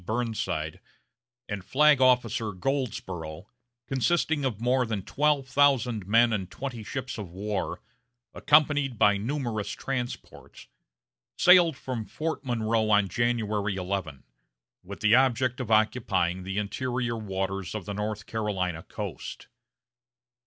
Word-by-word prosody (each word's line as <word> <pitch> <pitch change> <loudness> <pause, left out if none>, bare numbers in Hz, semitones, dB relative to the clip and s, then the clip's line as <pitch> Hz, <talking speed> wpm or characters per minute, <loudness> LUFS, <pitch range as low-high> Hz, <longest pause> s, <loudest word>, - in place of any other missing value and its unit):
Burnside 110 -8 -2 0.7
and 100 -3 -5
Flag 150 +4 +4
Officer 120 -4 +2
Goldsborough, 95 - -3 0.4
consisting 150 +2 +1
of 120 -6 -1
more 125 +2 +2
than 110 -5 -3
twelve 145 +1 +1
thousand 130 -7 +2
men 115 +2 +4
and 95 -4 -2
twenty 120 +4 -6
ships 130 +1 -5
of 100 -4 -6
war, 100 +3 -3 0.5
accompanied 145 -4 +3
by 105 -1 +4
numerous 115 -2 -3
transports, 125 +4 -6 0.7
sailed 175 -5 +6
from 120 -4 -4
Fort 160 +2 -4
Monroe 115 -3 0
on 105 -2 +4
January 110 -4 0
11, 90 -7 -4 0.6
with 100 +2 -10
the 110 +1 +4
object 130 0 +3
of 125 -4 -4
occupying 110 -5 +1
the 95 +1 -5
interior 120 +3 -2
waters 95 -3 -3
of 105 -5 -5
the 100 - -4
North 105 +1 -4
Carolina 95 -6 -2
coast. - - -7
110 Hz, 120 wpm, -27 LUFS, 100-130 Hz, 0.7 s, sailed